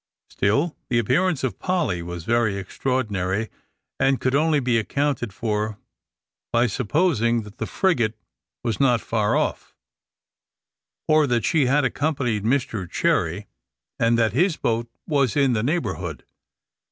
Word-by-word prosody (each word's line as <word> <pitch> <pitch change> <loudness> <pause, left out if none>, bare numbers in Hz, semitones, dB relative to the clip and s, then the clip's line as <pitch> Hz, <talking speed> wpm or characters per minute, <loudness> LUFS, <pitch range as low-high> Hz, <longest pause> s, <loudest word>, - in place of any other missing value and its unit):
Still 140 - +1
the 120 - +2
appearance 135 - +1
of 120 -8 -2
Polly 175 - 0
was 85 0 -6
very 110 -1 +1
extraordinary, 105 -2 -2 0.5
and 135 0 +2
could 130 - 0
only 150 +1 +3
be 125 -3 +2
accounted 140 -1 -1
for 105 0 -2 0.7
by 120 +1 +3
supposing 120 - +1
that 105 +2 -14
the - - -2
frigate 120 - +1 0.5
was 115 -3 -2
not 125 -4 +4
far 110 -1 0
off; - - -2 1.3
or 155 -1 +4
that 120 -3 +1
she 150 -5 +2
had 140 +2 +3
accompanied 130 -6 -1
Mr 110 -6 -1
Cherry, 90 +6 0 0.5
and 115 +1 +3
that 110 -3 +2
his 170 +5 +2
boat 115 +1 -1 0.2
was 140 - +1
in 135 -3 +3
the 110 - +1
neighbourhood. 105 - -2
120 Hz, 135 wpm, -23 LUFS, 105-140 Hz, 1.3 s, not